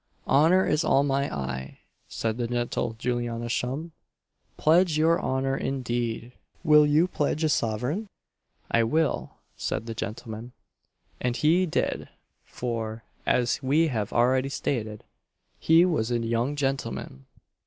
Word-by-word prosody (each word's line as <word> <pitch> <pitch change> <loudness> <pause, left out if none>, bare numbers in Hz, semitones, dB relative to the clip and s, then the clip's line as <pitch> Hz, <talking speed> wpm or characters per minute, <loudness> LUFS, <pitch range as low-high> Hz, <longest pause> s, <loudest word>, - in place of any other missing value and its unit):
"Honour 165 +7 +5
is 150 +2 +1
all 140 - +3
my 140 0 0
eye," 65 -1 -5 0.3
said 110 0 -2
the 120 - 0
gentle 120 -1 -2
Juliana 120 -1 -2
Shum?" 135 +8 -2 0.7
pledge 165 0 +4
your 165 +2 +3
honour 135 +1 0
indeed! 120 -3 -2 0.3
will 150 -2 +6
you 155 +4 +4
pledge 155 -2 -1
a 155 - +3
sovereign?" 125 - -1 0.6
"I 115 - +4
will!" 155 +7 0 0.2
said - - -3
the 115 - -5
gentleman; 110 +2 -6 0.7
and 125 -1 -1
he 175 +4 +3
did 155 - -1 0.3
for, 115 -2 -4 0.2
as 125 +2 +2
we 150 +5 +2
have 110 -5 -2
already 130 +3 +2
stated, 110 -6 -3 0.6
he 165 +2 +5
was 155 -11 0
a 120 - +1
young 115 +4 -1
gentleman. 135 - -3
125 Hz, 130 wpm, -26 LUFS, 115-150 Hz, 0.7 s, will